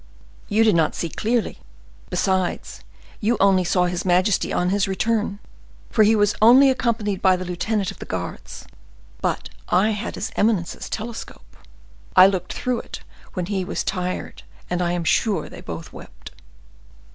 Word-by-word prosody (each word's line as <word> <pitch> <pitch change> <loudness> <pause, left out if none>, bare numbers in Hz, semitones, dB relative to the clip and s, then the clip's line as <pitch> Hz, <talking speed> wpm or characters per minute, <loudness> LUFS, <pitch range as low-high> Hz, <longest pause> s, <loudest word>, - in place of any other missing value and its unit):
"You 220 +1 +3
did 220 - +4
not 165 -2 +2
see 170 - -3
clearly. 225 +6 -1 0.5
Besides, 185 -2 -1 0.4
you 225 +2 +1
only 195 -2 +4
saw 180 +1 +2
his 175 0 -2
majesty 185 +2 +2
on 180 +1 0
his 200 0 +1
return, 205 +1 -1 0.5
for 220 - +3
he 215 +1 +5
was 205 -1 +3
only 260 +5 +7
accompanied 220 -6 -1
by 185 -1 +5
the 185 0 -5
lieutenant 195 +3 -2
of - - -14
the - - -8
guards. - - -6 0.6
But - - -2 0.2
I 195 +5 +3
had 210 -1 -4
his - - -4
eminence's 205 -5 0
telescope; 225 +2 -7 0.6
I 185 - +9
looked 185 -2 0
through 250 -2 -1
it - - -9 0.3
when 180 -2 -2
he 190 0 -2
was 180 - -3
tired, 185 -1 -3 0.3
and 180 0 0
I 175 0 0
am 175 -1 -2
sure 190 0 +1
they - - -11
both 80 -1 -8
wept." - - -12
195 Hz, 160 wpm, -22 LUFS, 180-220 Hz, 0.6 s, I